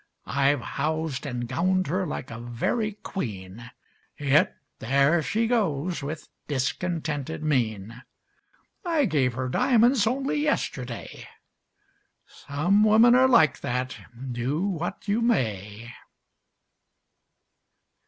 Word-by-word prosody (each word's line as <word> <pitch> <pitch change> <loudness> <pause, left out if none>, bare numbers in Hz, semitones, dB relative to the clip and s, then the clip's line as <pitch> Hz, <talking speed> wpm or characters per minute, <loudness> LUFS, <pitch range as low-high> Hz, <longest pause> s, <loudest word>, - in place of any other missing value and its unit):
I've 140 0 +1
housed 155 +1 -3
and 120 -3 -4
gowned 185 +8 +1
her 185 +4 -1
like 130 - -5
a 115 - -7
very 120 - -2
queen 110 - -6 0.5
Yet 145 0 +3 0.2
there 140 +7 +3
she 215 - 0
goes, 180 - 0
with 155 +3 -6 0.2
discontented 150 +2 -2
mien. 115 -5 -1 0.8
I 330 -6 +2
gave 140 - +1
her 130 +1 -2
diamonds 235 - +3
only 270 +4 0
yesterday: 305 0 -3 1.0
Some 175 +9 0
women 220 +3 +6
are 260 +1 +6
like 160 - +4
that, 125 +1 -2 0.4
do 130 +9 -1
what 180 +1 -4
you 210 +3 +1
may. 115 - -1
150 Hz, 105 wpm, -26 LUFS, 125-200 Hz, 1.0 s, women